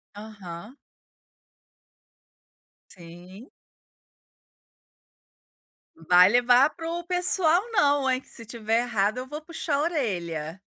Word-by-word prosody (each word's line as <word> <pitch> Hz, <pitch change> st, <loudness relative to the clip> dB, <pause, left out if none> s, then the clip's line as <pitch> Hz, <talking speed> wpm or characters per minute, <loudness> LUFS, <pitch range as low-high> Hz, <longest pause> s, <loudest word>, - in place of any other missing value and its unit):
Aham. 205 Hz, +1 st, -10 dB, 2.1 s
Sim. 180 Hz, +6 st, -14 dB, 2.5 s
Vai 180 Hz, +2 st, +5 dB
levar 245 Hz, +5 st, +4 dB
para 330 Hz, -1 st, -7 dB
o 345 Hz, +1 st, -4 dB
pessoal 360 Hz, -1 st, +2 dB
não 290 Hz, -9 st, +2 dB
hein, 255 Hz, 0 st, +1 dB
que -, -, -27 dB
se -, -, -13 dB
estiver 225 Hz, 0 st, -2 dB
errada 220 Hz, -1 st, -1 dB
eu 255 Hz, -, -9 dB
vou 300 Hz, +3 st, -7 dB
puxar 320 Hz, -2 st, -4 dB
a 280 Hz, -, 0 dB
orelha. 180 Hz, -, -3 dB
245 Hz, 100 wpm, -25 LUFS, 190-300 Hz, 2.5 s, Vai